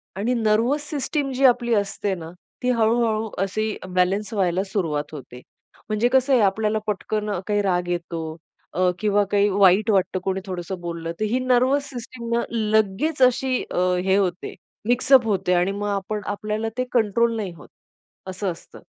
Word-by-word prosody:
आणि 215 +6 0
nervous 235 +6 +1
system 285 -1 -2
जी 265 +2 +2
आपली 240 -2 +4
असते 200 -1 -1
ना, 165 -2 -8 0.3
ती 250 - +1
हळू-हळू 225 -2 +1
अशी 215 +2 -2 0.2
बॅलन्स 195 +5 +1
व्हायला 185 -2 +1
सुरुवात 160 -7 -2
होते. 125 -4 -10 0.5
म्हणजे 215 +2 +2
कसं 265 +1 +4
आहे 250 - +5
आपल्याला 215 +2 +1
पटकन 210 +1 -2 0.2
काही 205 -1 +1
राग 180 -2 0
येतो 170 -2 -4 0.4
अ, 180 +3 +2
किंवा 205 -1 +2
काही 205 0 +4
वाईट 200 +2 +4
वाटतं 190 -2 +1
कोणी 190 0 -1
थोडसं 185 -1 -5
बोलल 170 -1 -4
तर, - - 0
ही 235 +4 0
नर्व्हस 260 +3 +2
सिस्टम 240 -2 -8
ना 235 - +2
लगेच 220 +6 0
अशी 255 0 +3
अ, - - -3 0.3
हे 190 0 +3
होते 185 -2 -1 0.4
मिक्स 245 +2 +1
अप 255 -3 +8
होते 190 -3 +1
आणि 180 +2 +2
मग 205 +1 -3
आपण 205 +2 -3
आपल्याला 215 +2 -3
ते 255 - +1
कंट्रोल 230 0 +2
नाही 200 -4 -3
होत. 155 - -14 0.6
असं 190 +1 -3
असतं. 165 - -12
210 Hz, 170 wpm, -23 LUFS, 190-235 Hz, 0.6 s, अप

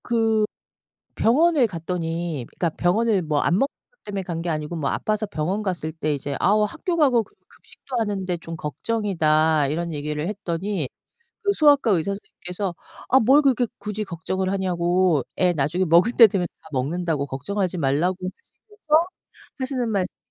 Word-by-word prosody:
그 225 -2 +2 0.7
병원에 290 +3 +4
갔더니 165 - -3
그러니까 170 - -2
병원을 205 +2 +2
뭐 155 -2 0
안 170 - +2
먹는 240 +9 +3 0.2
것 - - -40
때문에 200 -1 -4
간 170 -3 -4
게 175 - -4
아니고 155 +1 -3
뭐 145 -4 -1
아파서 215 0 -1
병원 190 +3 -2
갔을 175 -6 -3
때 155 -2 -1
이제 140 0 -4
"아오. 210 +3 +4
학교 335 - -3
가고 265 -7 +4
급 205 - -21
급식도 265 - -10
하는데 195 -4 -1
좀 165 0 -7
걱정이다." 160 -4 +1
이런 170 +3 -2
얘기를 150 +1 -3
했더니 185 -4 -3 0.5
그 405 -2 +2
소아과 290 - +4
의사 185 +1 +1
선생님께서 185 -2 -5 0.3
"아 265 - +6
뭘 265 +6 +5
그렇게 255 -4 +2
굳이 210 +1 -4
걱정을 190 +1 -3
하냐."고 180 -4 +1
"애 180 -1 +3
나중에 160 +5 0
먹을 175 +7 +5
때 230 -2 +9
되면 190 -3 -1 0.2
다 160 - -15
먹는다."고 150 +2 -1
"걱정하지 180 +7 -2
말라."고 160 +5 +1 0.5
하시면서 335 -6 +2 0.5
하시는 260 -3 -2
말씀이 195 -3 -2
185 Hz, 350 characters per minute, -23 LUFS, 165-220 Hz, 0.7 s, 때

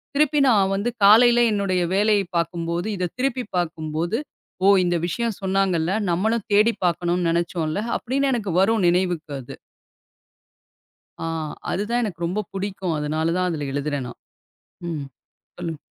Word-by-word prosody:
திருப்பி 295 0 +3
நான் 195 -4 +3
வந்து 205 +5 -1 0.2
காலையில 240 +3 +7
என்னுடைய 190 -3 0
வேலையை 205 -1 +3
பாக்கும் 170 0 -2
போது, 175 +4 -2
இத 180 -2 -2
திருப்பிப் 255 -5 -2
பாக்கும் 160 -3 -3
போது, 175 +7 0 0.5
ஓ, - - +6 0.2
இந்த 175 0 +1
விஷயம் 230 +3 -2
சொன்னாங்கல்ல. 190 -3 +1 0.2
நம்மளும் 220 +5 0
தேடி 215 +3 +5
பாக்கனும்னு 175 0 0
நெனைச்சோல 170 0 -1 0.2
அப்படின்னு, 275 +3 -1
எனக்கு 215 -5 -2
வரும் 215 0 +3
நினைவுக்கு 175 -3 0
அது. 120 - -10 1.7
ஆ. - - -1 0.4
அது 200 - -1
தான் 240 +1 +2
எனக்கு 175 -6 -3
ரொம்ப 195 +5 -1
புடிக்கும். 190 -3 -3
அதனால 155 +2 -1
தான் 180 0 +1
அதுல 145 -4 -3
எழுதுறேன் 145 -2 -2
நான். - - -12 0.7
ம் 150 -4 -4 0.5
சொல்லுங் 165 -3 -5
185 Hz, 145 wpm, -23 LUFS, 165-210 Hz, 1.7 s, காலையில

